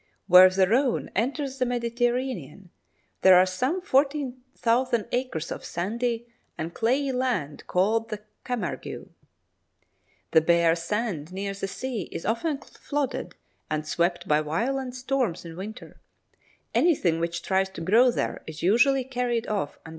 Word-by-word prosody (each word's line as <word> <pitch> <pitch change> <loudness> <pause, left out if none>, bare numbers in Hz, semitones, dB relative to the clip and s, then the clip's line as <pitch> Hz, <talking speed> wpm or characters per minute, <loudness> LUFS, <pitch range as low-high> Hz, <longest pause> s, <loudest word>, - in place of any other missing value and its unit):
Where 185 0 +9
the 185 0 +2
Rhone 250 +4 +1
enters 270 +4 -1
the 255 - +2
Mediterranean, 240 - -2 0.5
there 190 -1 +8
are 185 - +6
some 255 - -1
40,000 260 - 0
acres 245 -11 -2
of - - -5
sandy 230 +6 -2 0.3
and 165 +2 -4
clayey 265 +4 +1
land 245 - -2
called 220 +5 +1
the 210 -1 -6 0.2
Camargue. 240 -8 -4 1.2
The 160 - +6
bare 170 0 +4
sand 170 -2 -3
near 195 +1 -3
the 195 0 -4
sea 235 -2 -4
is - - -6
often 285 +7 0
flooded 285 -2 -4 0.3
and 155 0 -2
swept 175 +2 0
by 150 -1 +3
violent 245 - -2
storms 255 -9 -1
in 165 -1 -8
winter; 205 +5 -9 0.7
anything 190 - +3
which 170 0 -2
tries 190 0 +1
to 190 - -9
grow 225 +9 +5
there 240 - -2
is 160 -1 -8
usually 245 +7 +4
carried[75 245 -3 -1
b] - - -11
off 200 -9 -1
and - - -32
destroyed. - - -11
225 Hz, 145 wpm, -26 LUFS, 180-255 Hz, 1.2 s, Where